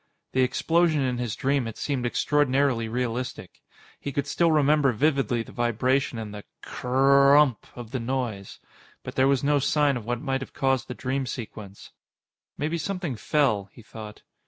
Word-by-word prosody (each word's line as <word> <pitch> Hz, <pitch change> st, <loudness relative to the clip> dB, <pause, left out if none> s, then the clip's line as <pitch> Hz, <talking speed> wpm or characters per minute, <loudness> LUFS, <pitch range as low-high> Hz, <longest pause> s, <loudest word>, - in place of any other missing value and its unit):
The 130 Hz, -, +1 dB
explosion 160 Hz, +4 st, +2 dB
in 125 Hz, -2 st, -1 dB
his 120 Hz, -3 st, -2 dB
dream 135 Hz, -1 st, 0 dB
had 115 Hz, -, -7 dB
seemed 130 Hz, -4 st, -2 dB
extraordinarily 135 Hz, -3 st, +1 dB
realistic. 125 Hz, +1 st, -4 dB, 0.4 s
He 140 Hz, -, -5 dB
could 140 Hz, +1 st, -2 dB
still 165 Hz, +4 st, +2 dB
remember 150 Hz, -2 st, +3 dB
vividly 135 Hz, -2 st, +1 dB
the -, -, -13 dB
vibration 120 Hz, +2 st, 0 dB
and 110 Hz, -2 st, -6 dB
the 105 Hz, -1 st, -8 dB, 0.2 s
cr -, -, -8 dB
r 140 Hz, +2 st, +5 dB
r -, -, +8 dB
ump! 140 Hz, -7 st, +2 dB
of 120 Hz, -2 st, -9 dB
the 130 Hz, -, -2 dB
noise. 115 Hz, -5 st, -3 dB, 0.5 s
But -, -, -7 dB
there 130 Hz, 0 st, +3 dB
was 135 Hz, -1 st, +2 dB
no 145 Hz, 0 st, +3 dB
sign 145 Hz, -1 st, +2 dB
of 115 Hz, -, -8 dB
what 120 Hz, -1 st, -1 dB
might 135 Hz, 0 st, -2 dB
have 135 Hz, -, -8 dB
caused 135 Hz, -2 st, 0 dB
the 125 Hz, -, -6 dB
dream 130 Hz, +1 st, -2 dB
sequence. 105 Hz, -4 st, -8 dB, 0.7 s
Maybe 160 Hz, +3 st, -2 dB
something 175 Hz, -5 st, -3 dB
fell, 110 Hz, -5 st, +1 dB
he 115 Hz, -, -15 dB
thought. 105 Hz, -1 st, -10 dB
130 Hz, 180 wpm, -26 LUFS, 120-140 Hz, 0.7 s, r